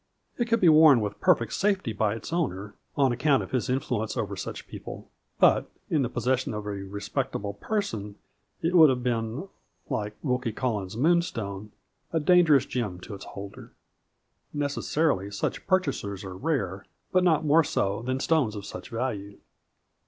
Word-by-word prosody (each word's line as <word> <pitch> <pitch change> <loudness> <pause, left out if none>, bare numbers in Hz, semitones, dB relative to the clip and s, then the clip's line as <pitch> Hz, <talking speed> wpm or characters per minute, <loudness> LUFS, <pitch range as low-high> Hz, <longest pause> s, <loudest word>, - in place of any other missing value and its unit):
It 240 - +2
could 230 0 +2
be 185 - +4
worn 155 -4 +8
with 105 -2 -4
perfect 115 -2 +3
safety 195 - 0
by 105 +1 0
its 115 - -7
owner, 105 - -2 0.2
on 135 -3 +4
account 135 +3 +2
of - - -10
his 130 0 -1
influence 125 -4 -1
over - - -2
such - - -6
people, - - -9 0.3
but - - +4 0.2
in 155 - +3
the 125 - 0
possession 130 -1 -1
of 105 -1 -5
a - - -3
respectable 100 0 -3
person 110 - -3 0.5
it 165 +2 +1
would 160 -4 +8
have 125 -2 0
been, 120 - -2 0.4
like 105 0 -2
Wilkie 125 -5 -1
Collins's 110 -5 -2
Moonstone, 115 - 0 0.4
a 165 - +1
dangerous 155 -4 +5
gem 105 -8 -3
to 105 - -8
its 100 - -8
holder. 100 0 -9 0.8
Necessarily 145 - 0
such 100 - -3
purchasers 135 - 0
are 95 -1 -7
rare, 100 - -2 0.2
but 185 0 +3
not 160 -3 +3
more 155 +2 +5
so 100 -7 -1
than 130 +2 -2
stones 135 -8 +1
of 100 -1 -6
such - - -8
value. 110 -4 -4
125 Hz, 160 wpm, -27 LUFS, 105-155 Hz, 0.8 s, worn